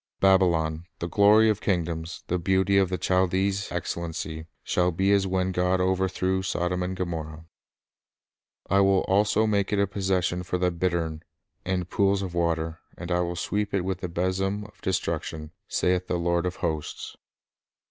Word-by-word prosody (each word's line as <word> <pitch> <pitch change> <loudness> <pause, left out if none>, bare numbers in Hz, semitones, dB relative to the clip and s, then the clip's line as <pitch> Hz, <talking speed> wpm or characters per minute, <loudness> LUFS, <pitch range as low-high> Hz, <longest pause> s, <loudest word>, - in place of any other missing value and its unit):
'• - - -68
Babylon, 85 -4 +3
the 85 - -3
glory 105 +4 +5
of 105 -1 +1
kingdoms, 85 -2 -2
The 90 - -1
beauty 95 +2 +3
of 95 -2 +2
the 90 - -1
Chaldee's 95 +2 +1
excellency, 80 -2 -4 0.2
Shall 90 0 +1
be 95 +3 +1
as 100 -1 +3
when 95 0 0
God 90 +1 +1
overthrew 95 0 0
Sodom 90 -1 -1
and 90 +1 -2
Gomorrah." 80 -3 -4 1.2
"I 95 - +3
will 95 -1 +4
also 105 +3 +2
make 100 -2 +1
it 105 - +1
a 100 - +3
possession 95 -2 -1
for 90 0 -2
the 90 0 +1
bittern, 85 -2 -1 0.4
and 90 -1 -1
pools 100 +1 +1
of 90 -2 -5
water; 85 -1 -1 0.2
and 85 0 -6
I 90 - +2
will 85 0 -1
sweep 105 +4 -2
it 100 - +1
with 95 0 -3
the 90 - -3
besom 95 +4 -1
of 105 - -17
destruction, 80 -4 -2 0.2
saith 90 0 0
the 90 - 0
Lord 85 +1 0
of 90 - -4
hosts." 80 -3 -4
90 Hz, 170 wpm, -26 LUFS, 85-95 Hz, 1.2 s, glory